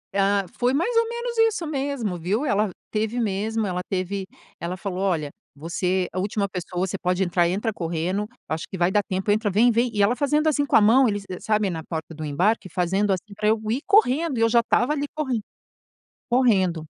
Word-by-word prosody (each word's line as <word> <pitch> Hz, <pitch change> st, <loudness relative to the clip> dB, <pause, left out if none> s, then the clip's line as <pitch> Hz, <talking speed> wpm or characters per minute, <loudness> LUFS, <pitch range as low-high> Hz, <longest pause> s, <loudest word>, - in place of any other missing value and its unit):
Ah, 200 Hz, 0 st, +2 dB
foi 245 Hz, +1 st, +2 dB
mais 405 Hz, +11 st, 0 dB
ou 460 Hz, 0 st, +3 dB
menos 475 Hz, 0 st, -4 dB
isso 450 Hz, -6 st, +2 dB
mesmo, 275 Hz, -, -2 dB
viu, 200 Hz, -, -1 dB
ela 210 Hz, -4 st, +1 dB, 0.2 s
teve 220 Hz, +2 st, -1 dB
mesmo 220 Hz, +1 st, -1 dB
ela 180 Hz, -2 st, -2 dB
teve. 190 Hz, +1 st, -2 dB, 0.3 s
Ela 175 Hz, +2 st, -4 dB
falou: 190 Hz, -1 st, -4 dB
"Olha, 165 Hz, -7 st, 0 dB, 0.2 s
você 180 Hz, +4 st, -1 dB
a 185 Hz, -, -2 dB
última 200 Hz, +1 st, -1 dB
pessoa 180 Hz, -1 st, -3 dB
você 190 Hz, 0 st, -4 dB
pode 180 Hz, +1 st, +1 dB
entrar 175 Hz, -1 st, +2 dB
entra 210 Hz, +4 st, -1 dB
correndo 175 Hz, +4 st, -2 dB, 0.2 s
acho 160 Hz, 0 st, -3 dB
que 190 Hz, -, -6 dB
vai 175 Hz, +1 st, +2 dB
dar 210 Hz, -, +3 dB
tempo, 190 Hz, +2 st, -1 dB
entra, 210 Hz, 0 st, +1 dB
vem, 225 Hz, +6 st, +4 dB
vem". 235 Hz, +2 st, +2 dB
E 205 Hz, -2 st, +1 dB
ela 220 Hz, +5 st, +3 dB
fazendo 295 Hz, +3 st, +1 dB
assim 290 Hz, -2 st, +2 dB
com -, -, +1 dB
a -, -, +7 dB
mão 240 Hz, +5 st, +5 dB
eles 205 Hz, -2 st, -2 dB
e 185 Hz, -, -6 dB
sabem 210 Hz, -3 st, +1 dB
na 160 Hz, -2 st, -5 dB
porta 160 Hz, 0 st, -6 dB
do 155 Hz, 0 st, -7 dB
embarque 185 Hz, +8 st, 0 dB
fazendo 190 Hz, +4 st, 0 dB
assim 190 Hz, +2 st, -3 dB
pra 210 Hz, +1 st, -1 dB
eu 220 Hz, +1 st, +3 dB
ir 255 Hz, +5 st, -1 dB
correndo, 330 Hz, -, +3 dB
e -, -, 0 dB
eu 230 Hz, -, +4 dB
já 235 Hz, -, +5 dB
estava 245 Hz, +4 st, +2 dB
ali 290 Hz, -1 st, -2 dB
corren 265 Hz, -7 st, -1 dB, 0.9 s
correndo. 190 Hz, -10 st, +2 dB
205 Hz, 210 wpm, -24 LUFS, 185-245 Hz, 0.9 s, a